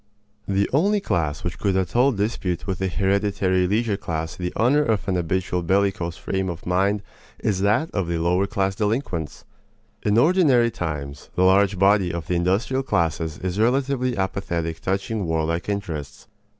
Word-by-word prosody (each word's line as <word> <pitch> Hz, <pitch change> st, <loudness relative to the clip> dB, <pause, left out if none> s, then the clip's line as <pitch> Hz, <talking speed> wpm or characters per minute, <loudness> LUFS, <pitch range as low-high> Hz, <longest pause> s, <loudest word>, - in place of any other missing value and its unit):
The 100 Hz, 0 st, +1 dB
only 200 Hz, +9 st, +3 dB
class 80 Hz, -, -1 dB
which 85 Hz, -, -4 dB
could 95 Hz, -2 st, +1 dB
at 95 Hz, +1 st, -2 dB
all 130 Hz, +3 st, +5 dB
dispute 100 Hz, -5 st, -2 dB
with 95 Hz, -2 st, -3 dB
the 95 Hz, -, 0 dB
hereditary 95 Hz, 0 st, +1 dB
leisure 105 Hz, +1 st, 0 dB
class 80 Hz, -4 st, -4 dB
the 90 Hz, -1 st, -3 dB
honor 130 Hz, +6 st, +3 dB
of 110 Hz, -8 st, 0 dB
an 95 Hz, -, +1 dB
habitual 90 Hz, +1 st, -1 dB
bellicose 95 Hz, -1 st, 0 dB
frame 95 Hz, -1 st, -2 dB
of 85 Hz, -2 st, -7 dB
mind 95 Hz, +3 st, +1 dB, 0.3 s
is 100 Hz, -3 st, -1 dB
that 105 Hz, +11 st, +2 dB
of 95 Hz, -4 st, -1 dB
the 85 Hz, 0 st, -1 dB
lower 90 Hz, +4 st, +1 dB
class 95 Hz, -1 st, 0 dB
delinquents. 105 Hz, -, -2 dB, 0.6 s
In 105 Hz, +1 st, +1 dB
ordinary 135 Hz, -6 st, +4 dB
times, 75 Hz, -6 st, -5 dB
the 90 Hz, -, +2 dB
large 95 Hz, +1 st, +4 dB
body 95 Hz, -1 st, +3 dB
of 85 Hz, -2 st, -4 dB
the 90 Hz, -, -2 dB
industrial 95 Hz, +10 st, +1 dB
classes 80 Hz, -, -1 dB
is 95 Hz, +2 st, -3 dB
relatively 130 Hz, +1 st, +1 dB
apathetic 85 Hz, -4 st, -2 dB
touching 100 Hz, +1 st, -2 dB
warlike 80 Hz, +3 st, -1 dB
interests. 80 Hz, -9 st, -5 dB
95 Hz, 165 wpm, -23 LUFS, 85-105 Hz, 0.6 s, all